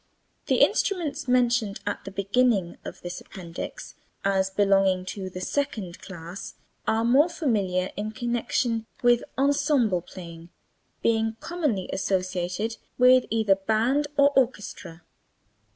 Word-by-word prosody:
The -, -, +3 dB
instruments 310 Hz, -7 st, +1 dB
mentioned 245 Hz, -4 st, +2 dB
at 205 Hz, -, -3 dB
the 195 Hz, -, -6 dB
beginning 200 Hz, -1 st, +1 dB
of -, -, -8 dB
this 175 Hz, 0 st, -5 dB
appendix 175 Hz, -4 st, -8 dB, 0.3 s
as 190 Hz, -1 st, +2 dB
belonging 195 Hz, -2 st, +3 dB
to 190 Hz, -2 st, -5 dB
the 185 Hz, 0 st, -7 dB
second 215 Hz, -8 st, -2 dB
class 175 Hz, 0 st, -8 dB, 0.3 s
are 225 Hz, +1 st, +2 dB
more 275 Hz, +8 st, +5 dB
familiar 195 Hz, -, 0 dB
in 210 Hz, +1 st, -3 dB
connection 235 Hz, 0 st, -1 dB, 0.2 s
with 240 Hz, -1 st, +4 dB
ensemble 275 Hz, -, +2 dB
playing, 170 Hz, -2 st, -11 dB, 0.5 s
being 225 Hz, -1 st, +1 dB
commonly 300 Hz, -, -1 dB
associated 185 Hz, +3 st, -1 dB, 0.2 s
with 255 Hz, 0 st, +6 dB
either 220 Hz, -3 st, +3 dB
band 225 Hz, +9 st, +1 dB
or 280 Hz, 0 st, +6 dB
orchestra. 205 Hz, -9 st, -1 dB
215 Hz, 120 wpm, -26 LUFS, 190-250 Hz, 0.5 s, with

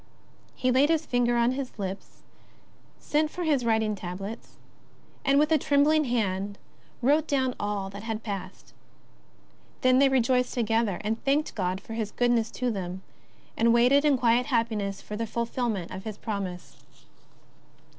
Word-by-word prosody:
He 255 Hz, -, +1 dB
laid 270 Hz, +4 st, +4 dB
his 325 Hz, -1 st, +1 dB
finger 245 Hz, -2 st, +1 dB
on 235 Hz, +1 st, +3 dB
his 260 Hz, -2 st, -5 dB
lips, 195 Hz, -1 st, -6 dB, 0.7 s
sent 305 Hz, +1 st, 0 dB
for 355 Hz, -, -5 dB
his 295 Hz, -6 st, +1 dB
writing 220 Hz, -2 st, +1 dB
tablets, 195 Hz, +3 st, -7 dB, 0.7 s
and, 275 Hz, 0 st, +3 dB
with 300 Hz, +2 st, +3 dB
a 315 Hz, -, +5 dB
tremb 285 Hz, +1 st, +3 dB
ling 310 Hz, 0 st, +3 dB
hand, 205 Hz, -4 st, -1 dB, 0.5 s
wrote 295 Hz, +4 st, +3 dB
do\^m 260 Hz, -3 st, +1 dB
all 205 Hz, -2 st, -2 dB
that 200 Hz, +1 st, -8 dB
had 225 Hz, 0 st, -4 dB
passed. 200 Hz, -3 st, -7 dB, 1.1 s
Then 255 Hz, 0 st, +4 dB
they 275 Hz, 0 st, +5 dB
rejoiced 250 Hz, -1 st, +2 dB
together, 225 Hz, -4 st, +1 dB
and 220 Hz, +2 st, -3 dB
thanked 290 Hz, +3 st, +1 dB
God 185 Hz, -2 st, -2 dB
for 225 Hz, -, -10 dB
His 220 Hz, -2 st, -2 dB
goodness 240 Hz, -1 st, +1 dB
to 250 Hz, -1 st, -2 dB
them, 190 Hz, -2 st, -5 dB, 0.5 s
and 230 Hz, +1 st, +3 dB
waited 255 Hz, +4 st, +5 dB
in 290 Hz, -3 st, +4 dB
quiet 240 Hz, +1 st, +2 dB
happiness 220 Hz, -6 st, -1 dB
for 210 Hz, -, -6 dB
the 225 Hz, +1 st, -3 dB
fulfilment 230 Hz, -5 st, -2 dB
of 190 Hz, +1 st, -7 dB
His 215 Hz, -2 st, -6 dB
promise. 190 Hz, -5 st, -5 dB
235 Hz, 155 wpm, -27 LUFS, 205-260 Hz, 1.1 s, a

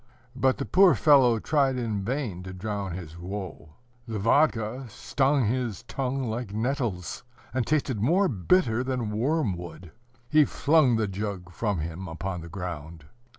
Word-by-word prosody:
But 130 Hz, 0 st, +2 dB
the 140 Hz, -, -3 dB
poor 185 Hz, -4 st, +5 dB
fellow 125 Hz, 0 st, +5 dB
tried 135 Hz, +2 st, +1 dB
in 110 Hz, -5 st, -2 dB
vain 120 Hz, -6 st, -3 dB
to 95 Hz, 0 st, -8 dB
drown 100 Hz, -1 st, -4 dB
his 85 Hz, -2 st, -8 dB
woe. 90 Hz, -5 st, -7 dB, 0.3 s
The 110 Hz, -1 st, -3 dB
vodka 120 Hz, +1 st, +2 dB
stung 135 Hz, +4 st, +1 dB
his 120 Hz, -1 st, -2 dB
tongue 135 Hz, +2 st, -2 dB
like 115 Hz, -2 st, -3 dB
nettles, 115 Hz, -7 st, -2 dB, 0.3 s
and 130 Hz, -2 st, -1 dB
tasted 135 Hz, -8 st, 0 dB
more 180 Hz, -, +3 dB
bitter 120 Hz, -, +2 dB
than 125 Hz, -4 st, -2 dB
wormwood. 95 Hz, -, -2 dB, 0.4 s
He 155 Hz, +2 st, +5 dB
flung 145 Hz, -3 st, +3 dB
the 110 Hz, -1 st, +1 dB
jug 95 Hz, -2 st, -5 dB
from 105 Hz, +1 st, -1 dB
him 85 Hz, +4 st, -5 dB
upon 90 Hz, +2 st, -4 dB
the 85 Hz, -, -9 dB
ground. 80 Hz, -4 st, -7 dB
110 Hz, 150 wpm, -27 LUFS, 95-135 Hz, 0.4 s, poor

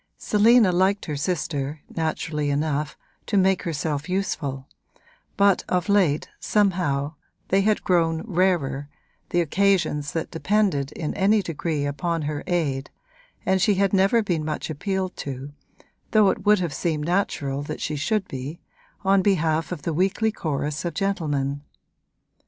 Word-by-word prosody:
Selina 220 Hz, -1 st, +4 dB
liked 190 Hz, +3 st, +2 dB
her 150 Hz, -, -3 dB
sister, 145 Hz, -2 st, -2 dB
naturally 155 Hz, -2 st, -1 dB
enough, 150 Hz, +1 st, -1 dB, 0.3 s
to 205 Hz, -, +1 dB
make 190 Hz, -1 st, +3 dB
herself 150 Hz, -1 st, -3 dB
useful, 145 Hz, -8 st, -2 dB, 0.7 s
but 200 Hz, -1 st, +4 dB
of 180 Hz, +2 st, 0 dB
late, 180 Hz, -8 st, +3 dB
somehow, 170 Hz, -8 st, +1 dB, 0.4 s
they 195 Hz, +1 st, +4 dB
had 210 Hz, +1 st, +1 dB
grown 165 Hz, -3 st, +2 dB
rarer, 170 Hz, -, 0 dB, 0.4 s
the 175 Hz, -, +2 dB
occasions 170 Hz, -4 st, +1 dB
that 165 Hz, -, -3 dB
depended 175 Hz, -6 st, +1 dB
in 155 Hz, -, -3 dB
any 205 Hz, +2 st, +3 dB
degree 155 Hz, -3 st, -2 dB
upon 155 Hz, +3 st, -2 dB
her 145 Hz, 0 st, -3 dB
aid, 145 Hz, -7 st, -1 dB, 0.6 s
and 190 Hz, 0 st, +2 dB
she 200 Hz, +2 st, +4 dB
had 195 Hz, 0 st, +1 dB
never 200 Hz, +4 st, +4 dB
been 175 Hz, -6 st, -1 dB
much 155 Hz, +1 st, -3 dB
appealed 190 Hz, +4 st, -2 dB
to 140 Hz, +1 st, -6 dB, 0.6 s
though 210 Hz, -3 st, +5 dB
it 205 Hz, 0 st, -6 dB
would 210 Hz, 0 st, +7 dB
have 175 Hz, -5 st, -2 dB
seemed 155 Hz, 0 st, -1 dB
natural 145 Hz, -6 st, -1 dB
she 150 Hz, -, -3 dB
should 195 Hz, +8 st, 0 dB
be 135 Hz, +5 st, -6 dB, 0.4 s
on 195 Hz, 0 st, +4 dB
behalf 165 Hz, -5 st, +1 dB
of 160 Hz, -6 st, -5 dB
the 165 Hz, -, -1 dB
weekly 195 Hz, +6 st, +1 dB
chorus 150 Hz, -5 st, -3 dB
of 170 Hz, -3 st, -3 dB
gentlemen. 145 Hz, -8 st, -1 dB
170 Hz, 140 wpm, -24 LUFS, 145-195 Hz, 0.7 s, would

